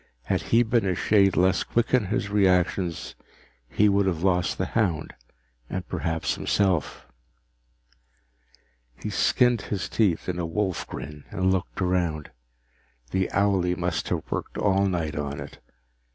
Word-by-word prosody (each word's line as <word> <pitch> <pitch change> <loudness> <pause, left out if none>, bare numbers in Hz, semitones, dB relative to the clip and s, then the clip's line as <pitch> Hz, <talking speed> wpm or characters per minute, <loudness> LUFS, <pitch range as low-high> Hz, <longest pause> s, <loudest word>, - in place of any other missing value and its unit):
Had - - 0
he 115 +1 +5
been 115 0 +1
a 95 -2 0
shade 100 0 +3
less 95 +1 +3
quick 120 +1 -1
in 125 -5 +4
his 100 0 -2
reactions, 90 -3 +1 0.6
he 105 +11 +3
would 100 -1 +3
have 85 -3 -1
lost 90 -2 +1
the 95 - 0
hound 90 -6 -1 0.6
and 95 -1 -4
perhaps 80 -1 -1
himself. 95 -6 0 1.9
He - - -6
skinned 120 -3 +3
his 100 -1 -3
teeth 100 -7 +1
in 90 -1 -2
a 85 - -1
wolf 95 +1 -2
grin 75 -1 -8
and 95 0 +1
looked 95 +1 -3
around. 85 -4 -1 0.8
The 95 -1 0
owlie 95 -3 +2
must 90 -1 -2
have - - -1
worked - - -4
all 100 -1 +2
night 85 -5 -2
on 70 -1 -3
it. - - -9
95 Hz, 145 wpm, -25 LUFS, 85-100 Hz, 1.9 s, he